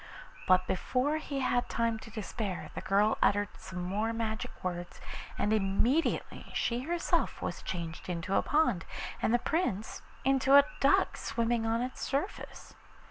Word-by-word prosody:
But 185 0 +5
before 255 - 0
he 280 -3 -3
had 245 -1 +1
time 230 -1 0
to 220 - -11
despair 215 -3 -4
the - - -5
girl 200 +3 +2
uttered 205 -1 +3
some 180 -1 -6
more 210 +5 -1
magic 220 -1 -2
words, 175 -1 -4 0.4
and 210 - +1
immediately 220 +9 +1
she 235 0 +1
herself 340 +6 0
was - - -4
changed 170 -1 -5
into 175 +2 -2
a - - +4
pond, 295 - +2 0.4
and - - +2
the 240 - +5
Prince 240 - -1 0.2
into 270 0 +5
a 285 0 +9
duck 275 - +3
swimming 230 -1 0
on 230 +2 +1
its 255 - -5
surface. 285 +9 -3
225 Hz, 150 wpm, -31 LUFS, 195-260 Hz, 0.4 s, a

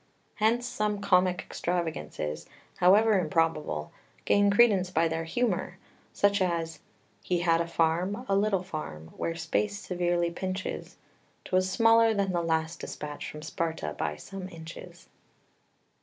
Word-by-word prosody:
Hence 230 +3 +2
some 210 -3 -1
comic 185 -2 +3
extravagances, 155 - -3 0.3
however 205 +3 +5
improbable, 155 - 0 0.3
gain 205 0 +4
credence 200 -4 +4
by 165 -2 +2
their 165 0 -2
humour, 240 +9 -1 0.3
such 200 0 +2
as 165 -3 -1 0.4
"He 175 -1 0
had 165 -1 +3
a 170 - -2
farm, 170 +8 0
a 195 - +2
little 200 -2 +2
farm, 80 - -7
where 165 - -2
space 185 +5 -1
severely 175 -3 0
pinches; 185 +2 -5 0.5
'Twas 185 0 +1
smaller 225 +2 +5
than 200 -2 +1
the 175 -1 0
last 160 0 -1
despatch 150 -1 -6
from 150 0 -9
Sparta 160 - -3
by 75 - -2
some 185 - -8
inches." 165 -1 -11
175 Hz, 130 wpm, -28 LUFS, 165-200 Hz, 0.5 s, however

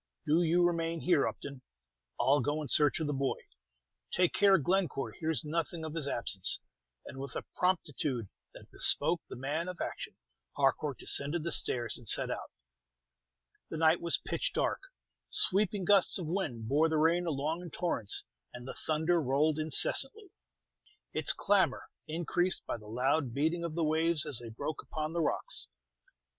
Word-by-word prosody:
"Do 160 +4 +3
you 175 +1 +3
remain 165 -1 -1
here, 170 -6 +3
Upton. 140 -2 -7 0.6
I'll 140 +1 +3
go 145 +4 -1
in - - -6
search 150 +2 +5
of 160 - -1
the 145 - -1
boy. 135 -1 -1 0.7
Take 180 -1 +2
care 200 -1 +5
Glencore 175 -3 -1
hears 160 0 -2
nothing 165 +1 -3
of 155 - -6
his 160 -4 -3
absence." 105 -7 +2 0.5
And 135 - -9
with 135 -1 -7
a - - -4
promptitude 150 - -1 0.3
that - - -14
bespoke 170 0 +5
the - - -7
man 145 +7 -3
of 180 -1 -6
action, - - -5 0.4
Harcourt 140 0 +1
descended 150 +4 0
the 170 - -2
stairs 120 -5 0
and 120 - -14
set - - +2
out. - - -5 1.2
The 160 - -5
night 160 +1 +3
was 170 - +4
pitch - - -3
dark; - - -1 0.5
sweeping 200 0 +1
gusts 200 -1 +4
of 180 - -5
wind 150 - -3
bore 150 +6 +3
the 160 - 0
rain 170 +3 +2
along 155 +3 -2
in 175 - -8
torrents, 145 - 0 0.3
and 125 +1 -9
the - - -5
thunder 160 +2 0
rolled 150 +3 +1
incessantly, 270 - -1 0.8
its - - +2
clamor - - +1 0.2
increased 175 +3 -1
by - - -3
the 105 -2 -14
loud 130 +3 0
beating 160 +4 0
of 165 -2 -4
the 170 - 0
waves 160 0 +2
as 145 -6 0
they 120 -1 -8
broke 140 +7 -5
upon 155 0 -5
the 170 - 0
rocks. 150 - -2
155 Hz, 165 wpm, -31 LUFS, 140-170 Hz, 1.2 s, search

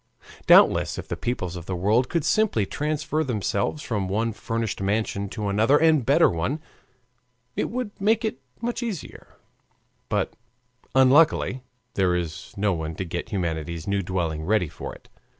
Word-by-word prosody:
Doubtless - - +6
if - - -6
the - - -3
peoples 95 -8 -3
of 85 -1 -8
the 95 - -2
world 105 +8 +2
could 170 -4 0
simply 210 - +2
transfer 150 +4 -1
themselves 115 +2 -1
from 105 -5 -2
one 110 +3 0
furnished 115 -1 -3
mansion 100 0 -1
to 105 0 -4
another 110 +8 +4
and 160 -4 +4
better - - +5
one 90 - -1 1.0
it - - -1
would 245 -2 -3
make 220 +3 +2
it 215 - -3 0.2
much 240 +1 -2
easier; 220 -9 -6 0.7
but - - 0 0.6
unluckily 135 0 +4 0.3
there 90 -2 +2
is 85 -2 -4
no 100 0 +2
one 80 -1 -4
to 95 - -4
get 85 0 -5
humanity's 85 -3 -3
new 100 0 +1
dwelling 85 -4 -2
ready 95 -2 +1
for - - -7
it. - - -18
105 Hz, 155 wpm, -25 LUFS, 90-145 Hz, 1.0 s, Doubtless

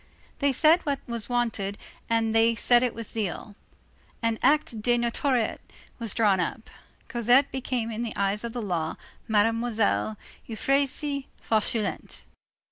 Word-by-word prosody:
They 280 -1 +3
said 315 +6 +4
what 280 -3 -1
was 235 -2 -4
wanted 225 -5 -1 0.3
and 225 -1 +1
they 225 +1 +4
said 240 +1 +4
it 250 -2 0
with 230 0 -4
zeal. 205 -1 -4 0.7
An 230 -1 0
acte 285 -7 +2
de 240 +2 +2
notoriété 240 0 0 0.4
was 230 -4 -3
drawn 205 -4 +3
up. 200 +5 -3 0.4
Cosette 245 +3 +3
became 250 -3 -2
in 220 +1 -4
the 235 -2 -4
eyes 200 +2 0
of 235 - -4
the 240 -1 -4
law, 170 -5 -2 0.3
Mademoiselle 220 0 +1 0.3
Euphrasie 275 +4 -1
Fauchelevent. 220 0 -1
230 Hz, 135 wpm, -26 LUFS, 215-250 Hz, 0.7 s, said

